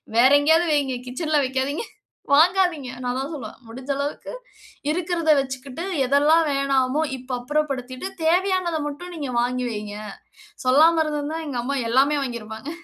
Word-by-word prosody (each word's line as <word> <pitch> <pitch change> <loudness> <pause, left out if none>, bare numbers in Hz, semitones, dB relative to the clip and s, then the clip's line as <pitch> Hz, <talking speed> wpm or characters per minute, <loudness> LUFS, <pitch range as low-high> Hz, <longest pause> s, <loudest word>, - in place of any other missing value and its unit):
"வேற 250 +3 +6
எங்கேயாவது 320 +4 +3
வைங்க. 275 -4 +1
கிட்சன்ல 305 +3 0
வைக்காதீங்க. 265 - -2 0.5
வாங்காதீங்க". 335 -4 +3
நான் 245 - -1
அதான் 270 +5 -4
சொல்லுவேன், 235 -5 -8
"முடிஞ்ச 260 +4 -6
அளவுக்கு 285 +1 -4 0.6
இருக்கிறத 335 -1 0
வச்சுக்கிட்டு, 265 +4 -6 0.2
எதெல்லாம் 295 +4 +4
வேணாமோ, 275 +1 +1 0.2
இப்ப 255 +1 -10
அப்புறப்படுத்திட்டு 270 +2 -2 0.2
தேவையானத 360 -1 +2
மட்டும் 350 +5 -7
நீங்க 280 -4 -4
வாங்கி 250 +1 -1
வைங்க." 210 -1 -6 0.7
சொல்லாம 320 +5 +5
இருந்திருந்தா, 300 +1 -3
எங்க 255 -4 -3
அம்மா 280 +3 -2
எல்லாமே 275 +5 +3
வாங்கியிருப்பாங்க. 230 0 -6
280 Hz, 130 wpm, -23 LUFS, 255-320 Hz, 0.7 s, வேற